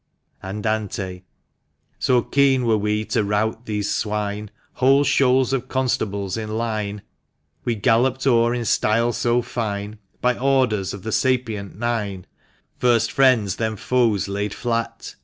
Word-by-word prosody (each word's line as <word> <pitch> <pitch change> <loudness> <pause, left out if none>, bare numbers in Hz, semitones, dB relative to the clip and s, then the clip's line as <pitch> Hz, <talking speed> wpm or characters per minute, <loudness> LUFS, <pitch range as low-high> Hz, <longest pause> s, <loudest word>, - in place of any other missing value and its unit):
Andante. 100 -2 -3 0.8
So 125 -2 +3
keen 135 -2 +2
were 115 -1 +3
we 105 +1 0
to 105 - 0
rout 110 +3 -1
these 105 -1 -2
swine, 105 -1 -2 0.2
Whole 135 +2 +4
shoals 130 -1 +3
of 130 -1 -1
constables 115 -7 -1
in 110 0 -4
line 105 -3 -3 0.6
We 120 - 0
galloped 125 +5 +2
o'er 120 -3 +4
in 120 -1 -3
style 115 +2 +2
so 120 +1 +1
fine, 105 -2 -4 0.2
By 125 -1 +1
orders 125 -8 +1
of 100 - -11
the 110 - -4
SAPIENT 115 -7 -1
NINE 105 -5 -2 0.3
— - - -41
First 120 -2 +3
friends, 125 -8 +3
then 110 -1 -1
foes, 110 -4 +1
laid 100 +1 -3
flat. 115 -1 -3
110 Hz, 140 wpm, -22 LUFS, 105-125 Hz, 0.8 s, Whole